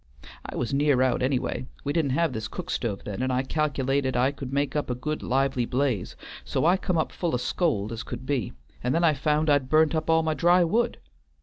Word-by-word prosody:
I - - -7
was 120 +2 -2
near 140 -2 +3
out 130 0 +1
anyway. 130 -1 -1 0.2
We 145 - -1
didn't 145 -5 +1
have 165 -5 +1
this 110 -1 -4
cook 180 +8 -6
stove 105 -5 -2
then, 105 +3 -4
and 130 0 0
I 130 +1 +1
cal'lated 135 -2 0
I 125 +3 +3
could 135 -2 -7
make 140 +1 -1
up 150 - -1
a 125 - -1
good 150 +5 -3
lively 135 -1 +1
blaze, 125 -7 -1 0.3
so 70 - -1
I 175 +3 +5
come 185 -2 -1
up 160 - 0
full 170 -6 -1
o' - - +2
scold 120 - -1
as 115 0 -4
I - - -11
could 120 +1 -6
be, 130 - -1 0.3
and 125 +3 +1
then 170 - +2
I 160 -2 +5
found 150 +2 +1
I'd 145 -3 +2
burnt 155 0 +4
up 160 0 -1
all 160 0 +4
my 160 0 +1
dry 175 +4 +4
wood. 230 +8 +1
140 Hz, 235 wpm, -26 LUFS, 125-155 Hz, 0.3 s, I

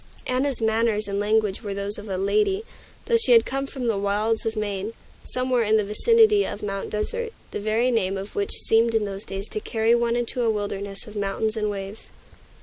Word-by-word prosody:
Anna's 255 -1 0
manners 220 -1 +1
and 200 0 -2
language 210 -1 +1
were 205 -3 -4
those 200 +1 -2
of 205 0 -9
a 190 - -2
lady, 395 - +1 0.4
though 465 - +3
she 460 +2 +5
had 460 - +6
come 275 +1 -2
from 265 -2 -5
the 225 -4 +1
wilds 210 +3 0
of 225 - -2
Maine, 205 0 -3 0.3
somewhere 255 -1 0
in 220 0 +3
the 215 - +2
vicinity 425 - +4
of 210 - -5
Mount 195 -1 -3
Desert, 460 - -3 0.2
the - - -3
very 220 +4 +1
name 195 -4 +1
of 195 +2 -7
which 200 - -1 0.2
seemed 225 +1 +3
in 220 -1 +2
those 195 0 -5
days 195 +2 -4
to - - +1
carry 225 +2 +1
one 235 0 +2
into 240 +1 -1
a 235 - +2
wilderness 200 -2 -3
of 215 - -12
mountains 205 +2 -1
and 210 -1 -1
waves. 200 +1 -6
220 Hz, 210 wpm, -24 LUFS, 200-240 Hz, 0.4 s, had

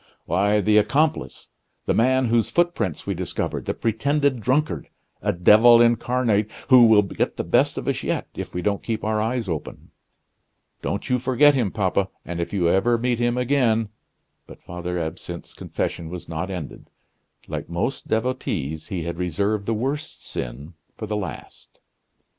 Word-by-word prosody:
"Why, 100 +2 +2
the 105 +1 +3
accomplice 145 +9 0 0.4
the - - +1
man 130 +3 +3
whose 115 -1 +2
footprints 170 - 0
we - - -1
discovered - - -3
the - - -2
pretended 140 +3 0
drunkard 145 +7 0 0.3
a - - +1
devil 110 +7 +6
incarnate, 120 -2 +2 0.2
who 125 -3 +8
will 105 -2 +6
get 100 - -2
the - - -1
best - - +2
of - - -5
us - - 0
yet, - - -2
if - - -6
we 90 - -4
don't 100 -1 0
keep 110 -2 -3
our 110 0 0
eyes 115 0 -1
open. 80 -4 -6 0.9
Don't 100 - -3
you 125 0 +1
forget 130 +4 +4
him, 120 -7 +1
papa; 95 -1 0 0.2
and 85 0 -5
if 85 - -3
you 90 -4 +1
ever 110 +7 +3
meet 120 0 0
him 120 0 +1
again 120 -4 +1 0.3
" - - -49
But - - -14
Father 90 +1 -5
Absinthe's 85 +1 -6
confession 80 -1 -4
was 90 0 -8
not 80 +3 -4
ended. 90 -6 -7 0.6
Like - - -5
most 85 +11 -3
devotees, 110 - -2
he 90 -4 -3
had 85 +1 -5
reserved 100 +4 -1
the 115 - +1
worst 140 +7 -4
sin 70 +7 -6 0.2
for 110 - -5
the 105 0 -3
last. 100 -3 -7
110 Hz, 165 wpm, -23 LUFS, 90-125 Hz, 0.9 s, who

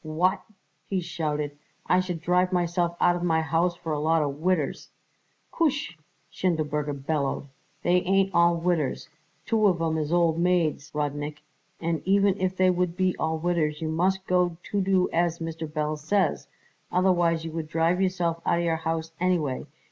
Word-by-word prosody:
"What!" 165 +4 +1 0.5
he 195 - 0
shouted. 150 -4 -3 0.3
"I 180 - +3
should 180 -3 -3
drive 180 +2 +2
myself 175 -1 0
out 175 - +4
of 175 - -4
my 165 -2 +2
house 165 +2 +1
for 165 -2 -6
a 150 - -1
lot 160 +1 +2
of 140 0 -3
widders!" 175 -3 -1 0.6
"Koosh!" 285 - 0 0.4
Schindelberger 150 -5 -1
bellowed. 140 -2 -1 0.3
"They 180 +1 +3
ain't 195 +1 +2
all 170 0 +4
widders. 165 -5 -1 0.4
Two 220 -2 +3
of 180 -4 +2
'em 160 -1 0
is 150 0 -2
old 170 -2 +2
maids, 170 -4 +1
Rudnik, 145 0 -3 0.4
and 165 -1 -1
even 195 0 +3
if 185 0 0
they 185 0 +4
would 180 -1 -1
be 185 -1 +1
all 160 0 0
widders 160 -3 0
you 160 - -3
must 185 +4 0
got 180 -1 +1
to 205 - -1
do 185 -1 +2
as 170 0 +1
Mr. 165 -1 -5
Belz 155 0 -2
says, 190 +6 0 0.4
otherwise 175 -3 +2
you 165 - -5
would 160 -1 -4
drive 165 +4 +1
yourself 175 -3 0
out 170 - +2
of 170 - 0
your 165 -1 +1
house 160 0 -3
anyway. 170 -7 0
170 Hz, 170 wpm, -26 LUFS, 155-180 Hz, 0.6 s, out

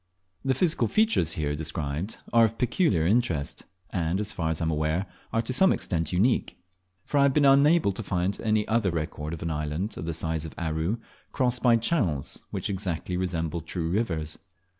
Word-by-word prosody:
The 135 -1 +1
physical 175 -3 +2
features 215 - +2
here 75 -4 -1
described 80 +4 -3 0.2
are 115 0 +6
of 115 +1 -3
peculiar 120 - +2
interest, 90 - 0 0.3
and, 85 +1 0
as 105 +1 -2
far 80 -2 -1
as 80 - 0
I 80 - -1
am 80 - +1
aware, 80 +4 0 0.3
are 115 - +1
to 130 - -2
some 190 +8 +6
extent 80 -2 -1
unique; 105 +8 +1 0.5
for 145 - +1
I - - +5
have 140 -1 +4
been 150 -1 +4
unable 140 -1 +5
to 100 - -4
find 95 -1 -1
any 110 -1 +1
other 110 -3 +2
record 80 -2 -3
of 85 -2 -5
an 85 - -2
island 75 +7 -3
of 80 - -5
the 85 - -1
size 80 -1 -1
of 80 - -8
Aru 80 +5 -1 0.4
crossed 125 -1 +1
by 120 -2 +5
channels 110 - -1
which - - -3
exactly 90 -3 -3
resemble 85 -2 -2
true 85 0 -3
rivers. 80 -7 -1
90 Hz, 190 wpm, -27 LUFS, 80-115 Hz, 0.5 s, are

